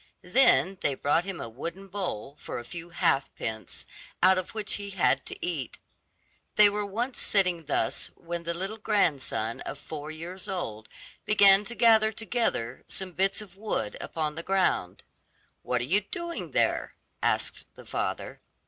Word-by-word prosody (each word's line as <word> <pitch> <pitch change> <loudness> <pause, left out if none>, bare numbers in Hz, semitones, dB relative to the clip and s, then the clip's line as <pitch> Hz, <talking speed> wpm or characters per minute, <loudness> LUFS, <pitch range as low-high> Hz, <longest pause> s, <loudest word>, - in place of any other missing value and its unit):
Then 185 - +4
they 140 - +1
brought 150 +6 +2
him 195 -3 -4
a - - -4
wooden 170 +12 -7
bowl 175 - -4
for - - -5
a 120 - -6
few 175 +4 -7
half 135 -5 +2
pence, 110 -1 -4 0.4
out 185 0 +7
of 185 +4 -7
which 215 -2 -1
he 200 0 -3
had 190 -2 +2
to - - -5
eat. 155 -8 -3 0.8
They 210 -1 +8
were 210 0 -1
once 240 +6 -2
sitting 180 -5 +2
thus 145 - 0
when 170 0 -5
the 170 0 -3
little 195 +5 -4
grandson 150 - +1
of - - -5
four 150 -1 -7
years 170 +4 -6
old 110 - -4 0.3
began 200 -1 +6
to 235 - -5
gather 220 -2 +6
together 220 - -1
some 190 -1 -4
bits 195 +4 +1
of 195 -3 -12
wood 195 - -2
upon 155 -2 -2
the 165 - -5
ground. 185 - +1 0.6
'What - - 0
are - - 0
you 185 +11 +3
doing 340 - -5
there?' - - +1 0.3
asked - - 0
the - - -13
father. - - -3
185 Hz, 165 wpm, -28 LUFS, 150-205 Hz, 0.8 s, They